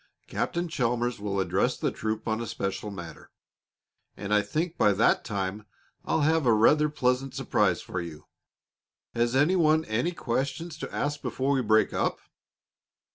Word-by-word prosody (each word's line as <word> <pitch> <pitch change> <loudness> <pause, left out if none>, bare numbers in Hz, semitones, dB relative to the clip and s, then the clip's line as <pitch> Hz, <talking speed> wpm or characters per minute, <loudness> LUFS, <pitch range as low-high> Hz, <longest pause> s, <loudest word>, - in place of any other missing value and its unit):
Captain 175 +1 -2
Chalmers 120 -5 -1
will 100 -1 -2
address 95 - +1
the - - -1
troop 110 +1 -3
on 110 +1 0
a 115 - -4
special 100 -2 -3
matter, 85 -5 -9 0.9
and 105 +1 -3
I 105 - +5
think 160 - -2
by 105 - +4
that 105 +4 +3
time 100 -1 -4 0.4
I'll - - +1
have 155 -2 +2
a 115 - +6
rather 150 +8 +4
pleasant 130 -2 0
surprise - - +1
for 95 - -4
you. 80 -3 -9 0.9
Has 120 +1 +1
any 150 +8 +4
one 160 -2 +3
any 120 +11 -1
questions 140 +5 -3
to - - -6
ask 145 0 -2
before 135 +2 -1
we 135 - +2
break 110 -1 +3
up?" - - 0
120 Hz, 160 wpm, -27 LUFS, 105-150 Hz, 0.9 s, a